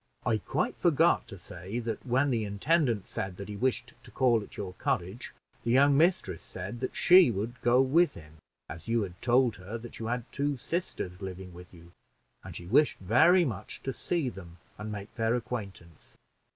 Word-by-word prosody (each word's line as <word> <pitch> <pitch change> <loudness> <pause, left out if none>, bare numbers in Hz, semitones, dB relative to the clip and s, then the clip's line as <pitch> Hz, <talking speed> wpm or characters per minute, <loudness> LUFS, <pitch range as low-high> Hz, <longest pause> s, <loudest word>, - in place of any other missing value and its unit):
I 110 -2 +2
quite - - -1
forgot - - +3
to - - -9
say, 95 +6 -7
that 115 -2 -3
when 135 +2 +1
the 115 -3 0
intendant 115 - +1
said 95 -1 -5
that 100 - -7
he 105 - -5
wished 120 +2 -1
to - - -11
call 120 -4 +2
at - - -12
your 95 -3 -5
cottage, 95 +6 -3 0.3
the - - -2
young 140 +3 +5
mistress 155 - +2
said 100 +6 -7
that 130 - -4
she 180 -5 +7
wished 115 +3 -3
to - - -31
go 120 +2 +4
with 165 +6 +3
him, 80 -1 -13 0.3
as 80 +1 -9
you 115 -1 +1
had 90 -2 -8
told 125 -1 +3
her 95 +5 -6
that 120 +1 -10
you 110 - -4
had 120 0 -2
two 140 0 -1
sisters 115 - -4
living 95 -1 -7
with 90 +1 -12
you, 85 -1 -16 0.5
and - - -9
she 85 - -7
wished 140 - +3
very 160 - +5
much 105 - -6
to 135 - -3
see 170 -1 -1
them 90 -7 -8 0.2
and 105 0 -5
make 105 0 -7
their 115 0 +1
acquaintance." 100 -9 -7
115 Hz, 195 wpm, -29 LUFS, 95-130 Hz, 0.5 s, she